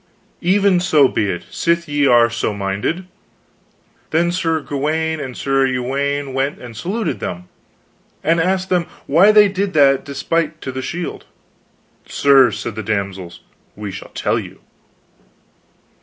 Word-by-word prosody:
"Even 190 +1 +3
so 155 -6 +4
be 105 -5 -1
it, 90 -2 -4
sith 170 0 0
ye 145 -1 +1
are 120 -2 +6
so 115 -2 -2
minded. 100 - -2 1.0
Then 170 +2 +1
Sir 165 -3 0
Gawaine 155 +3 -2
and 130 -3 -6
Sir 135 -1 +1
Uwaine 135 +2 -2
went 135 +2 -1
and 120 -2 -11
saluted 200 - -3
them, 90 0 -5 0.8
and 165 +2 +2
asked 185 +2 0
them 175 -2 +1 0.2
why 175 +9 +5
they 210 -1 +7
did 195 0 -2
that 140 -3 +4
despite 155 +3 -2
to 130 - -5
the 130 0 -5
shield. 175 +5 -5 0.8
Sirs, 135 -5 +4
said 120 - -5
the 110 - -5
damsels, 95 -4 -4 0.3
we 105 -1 -6
shall - - -9
tell - - 0
you. - - -10
140 Hz, 140 wpm, -18 LUFS, 120-170 Hz, 1.0 s, they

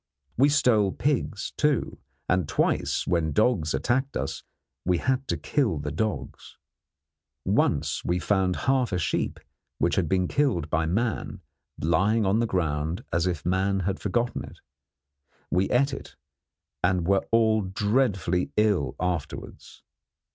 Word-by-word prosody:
We 140 +4 +4
stole 110 -9 +3
pigs, 130 -7 -1
too, 150 -4 0 0.3
and 90 -4 +1
twice - - 0
when 80 -3 0
dogs 100 -8 +2
attacked 130 +3 0
us 70 - -3 0.4
we 90 -1 +2
had 130 +5 -1
to - - -1
kill 115 - 0
the 75 0 -4
dogs. 105 +7 -4 0.9
Once 75 +2 +1
we 85 - 0
found 95 0 +1
half 130 -3 +2
a 90 - 0
sheep, 85 - -1 0.4
which - - +1
had 85 -5 +1
been 90 -1 +2
killed 100 - 0
by 80 0 +1
man, 110 +6 -2 0.4
lying 95 +8 +2
on 100 +3 +2
the 115 - +1
ground, 80 -2 -1
as 85 +2 +2
if 85 -4 -3
man 95 +2 +1
had 95 +1 -2
forgotten 120 +4 -1
it. - - -11 0.9
We 95 +2 +2
ate 135 +3 +2
it, - - -8 0.7
and 90 -2 +2
were 95 +2 +2
all 110 -1 +3
dreadfully 95 -2 0
ill 105 -10 +2
afterwards. 90 -4 -5
95 Hz, 140 wpm, -26 LUFS, 85-115 Hz, 0.9 s, We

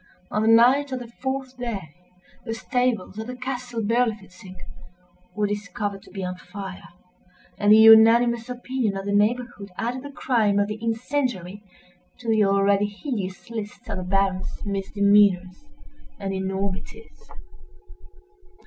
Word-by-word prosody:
On 210 - 0
the 220 - +1
night 250 +5 +5
of 260 - -2
the 240 -2 -9
fourth 265 0 -3
day, 200 -11 -5 0.5
the 225 -2 -4
stables 240 -5 -1
of 220 - -5
the 250 - -6
castle 250 -2 -4
Berlifitzing 210 -4 -2 0.8
were 210 0 +1
discovered 205 -1 -4
to - - -17
be 195 -2 -6
on 180 0 -4
fire; 190 0 -9 0.7
and 205 0 +4
the 215 - +9
unanimous 225 +2 +6
opinion 250 -4 -2
of 195 - -5
the 200 - -1
neighborhood 210 0 0
added 245 +3 -3
the 285 +1 -9
crime 225 -8 +1
of 205 0 +2
the 215 +1 -5
incendiary 225 -5 -2 0.6
to 245 - -12
the 220 -1 +3
already 200 +1 +3
hideous 205 -4 -5
list 215 -3 -7
of - - -3
the 185 - -4
Baron's 190 +1 -1
misdemeanors 200 +1 +2 0.5
and 195 -1 -4
enormities. 190 0 -5
210 Hz, 140 wpm, -24 LUFS, 195-245 Hz, 0.8 s, the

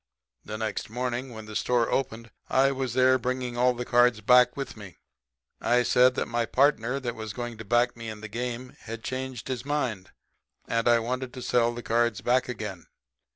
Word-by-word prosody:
The 110 - -6
next 110 -2 -3
morning 125 +2 -3
when 110 -2 -9
the 110 0 -9
store 120 0 +1
opened 115 -3 -2 0.2
I 135 +1 +4
was 130 -3 -3
there 130 0 +5
bringing 125 0 -2
all 125 +1 +3
the 125 0 -4
cards 120 -2 +4
back 125 +4 +5
with 140 - -5
me. 100 -5 -11 0.6
I 125 +1 +3
said 125 +1 +4
that - - 0
my 120 -1 -1
partner 135 -1 +2
that 120 -3 -3
was 110 -2 -6
going 120 0 -6
to 110 - -7
back 120 +3 +2
me 115 -1 -7
in 105 -1 -8
the 110 - -6
game 125 +3 -5
had 115 0 -8
changed 130 -2 -5
his 125 -2 -3
mind; 130 -10 -2 0.6
and 115 0 0
I 120 0 +6
wanted 125 +2 -3
to 125 - -6
sell 120 -1 +2
the 120 0 -7
cards 115 -3 +1
back 125 +4 +2
again. 105 -7 -6
120 Hz, 200 wpm, -27 LUFS, 115-125 Hz, 0.6 s, I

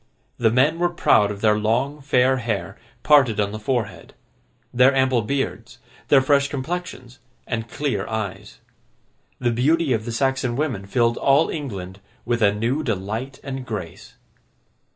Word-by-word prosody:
The 115 -2 +4
men 140 +8 +2
were 175 0 +2
proud 105 -11 +3
of 100 -1 -6
their 105 -1 +3
long 125 +7 -1
fair 130 -1 +2
hair, 115 -5 -3 0.3
parted 135 -8 +4
on 100 -1 0
the 110 - -6
forehead; 110 -1 -3 0.6
their 125 +3 +5
ample 130 -2 +2
beards, 115 -1 -3 0.3
their 140 -2 +5
fresh 140 0 +3
complexions, 140 -3 -6 0.3
and 115 -1 -4
clear 130 -9 -2
eyes. 110 -4 -5 0.8
The 120 -1 0
beauty 145 +5 +2
of 110 -1 -2
the 120 - -4
Saxon 130 0 0
women 125 -9 -2
filled 120 +1 +1
all 140 +3 +3
England 100 - -6 0.3
with 120 0 -1
a 100 -1 +5
new 115 +8 -1
delight 115 +2 -4
and 135 -1 -5
grace. 95 -8 -7
125 Hz, 150 wpm, -22 LUFS, 110-135 Hz, 0.8 s, their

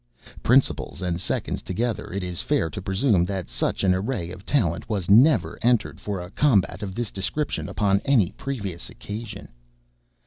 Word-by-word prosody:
Principals 130 +3 +2
and 90 -1 -1
seconds - - -2
together, 115 +5 -2
it 100 +1 -3
is 90 -2 -2
fair 80 - 0
to 100 - -6
presume 95 0 +2
that 95 -6 -4
such - - -1
an 95 -1 +4
array 95 -3 -2
of 95 +3 -11
talent 95 - 0
was 100 -4 -1
never 110 - +5
entered 120 -1 +2
for 100 -2 -3
a 90 +1 -8
combat 100 -8 +2
of 95 -2 -5
this 120 -3 -3
description 145 +10 -2
upon 100 -2 +2
any 125 -11 +3
previous 100 -11 -5
occasion. 105 -1 -7
100 Hz, 165 wpm, -24 LUFS, 90-120 Hz, -, never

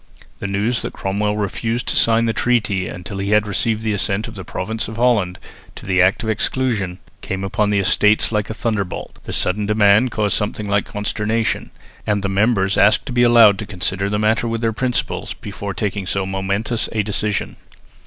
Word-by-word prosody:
The 100 - -3
news 105 +5 0
that - - -5
Cromwell 105 +2 -1
refused 115 +4 -2
to - - -1
sign 115 0 +4
the 115 - 0
treaty 105 -8 0
until 95 +2 -6
he 100 +2 +1
received 105 +2 -1
the 110 -1 0
assent 100 +1 0
of - - -9
the 95 - -8
Province 110 +6 -4
of 110 - -7
Holland 110 -7 +1 0.4
to - - -10
the 95 -1 +2
Act 95 +6 +3
of 110 - -2
Exclusion 110 -5 -1 0.2
came 95 0 -4
upon 105 +2 0
the 105 - +1
Estates 105 +3 +3
like 105 -1 -1
a 110 - -4
thunder 110 -3 0
bolt. 90 - -8
The - - -6
sudden 100 +3 +1
demand 105 +3 +4
caused 105 -3 0
something 105 0 -2
like 100 0 +1
consternation, 105 +2 -1 0.4
and 105 -1 0
the 100 - 0
members 100 -1 +1
asked 100 +3 +4
to 135 - -5
be 120 - +2
allowed 115 -4 +6
to 105 - -5
consider 100 0 -2
the 105 - 0
matter 110 +2 +1
with 115 0 -2
their 115 -1 0
principals 125 +2 -2
before 100 -1 -6
taking 100 -2 -3
so 100 0 -1
momentous 100 +4 -2
a 110 -2 +1
decision. 105 0 -2
105 Hz, 195 wpm, -19 LUFS, 100-110 Hz, 0.4 s, allowed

